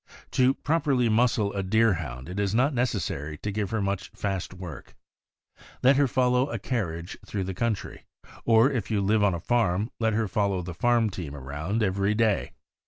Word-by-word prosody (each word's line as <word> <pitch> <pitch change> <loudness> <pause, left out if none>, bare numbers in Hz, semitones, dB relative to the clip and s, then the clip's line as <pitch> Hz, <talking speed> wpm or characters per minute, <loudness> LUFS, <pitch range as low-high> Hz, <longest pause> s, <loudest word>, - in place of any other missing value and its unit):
To 130 +1 +3
properly 145 -6 +1
muscle 110 -2 +2
a 100 - -1
Deerhound 90 - +1
it 90 +3 -5
is 100 0 0
not 130 +5 +3
necessary 90 - -2
to 105 - -4
give 100 -1 -2
her 110 -2 -1
much 100 -1 -2
fast 95 -3 -3
work. 90 -8 -9 0.9
Let 135 +2 +6
her 140 -1 +4
follow 125 +1 +2
a 115 - -3
carriage 90 -6 -3
through 100 -3 -3
the 95 +1 -4
country, 110 +2 -3 0.4
or 115 +4 +5
if 115 -7 -2
you 110 -2 +1
live 105 +2 +2
on 100 -3 +3
a - - -4
farm, 105 0 +1
let 110 -1 +1
her 110 0 +1
fol 100 +2 +1
low 95 -2 -1
the 90 0 -6
farm 115 +3 +2
team 80 -6 -6
around 75 - -3
every 100 +1 +1
day. 110 -2 +1
105 Hz, 185 wpm, -26 LUFS, 95-115 Hz, 0.9 s, Let